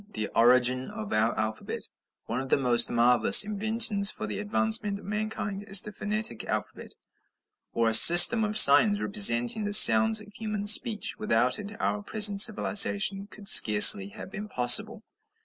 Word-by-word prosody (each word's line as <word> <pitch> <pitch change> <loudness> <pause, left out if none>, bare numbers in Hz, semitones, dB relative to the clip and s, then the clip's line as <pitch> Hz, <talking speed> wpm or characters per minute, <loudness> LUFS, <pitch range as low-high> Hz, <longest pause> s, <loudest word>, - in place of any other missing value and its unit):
THE 110 -1 -7
ORIGIN 125 +2 -2
OF 105 -1 -12
OUR 110 +2 -4
ALPHABET 110 0 -9 0.4
One 120 +3 -8
of 135 - -13
the - - -2
most 125 -3 -1
marvellous 120 - +2
inventions 215 0 -2
for 110 - -8
the 105 -2 -10
advancement 110 - -4
of - - -19
mankind 210 -1 -9
is 195 -2 +1
the 210 - -12
phonetic 210 - -8
alphabet, - - -10 0.8
or 115 -1 -5
a 110 - -4
system 175 - +6
of 210 0 -4
signs 205 +5 +4
representing 200 - +1
the 205 0 -1
sounds 220 0 +4
of 210 -1 -18
human 210 -2 -10
speech. 215 0 0
Without 125 - -4
it 205 +1 -14
our 210 - -6
present 205 -1 +1
civilization 205 -2 0
could 205 -1 -14
scarcely 105 - +4
have 100 - -16
been 210 0 -12
possible. 125 -6 0
200 Hz, 160 wpm, -22 LUFS, -, 0.8 s, system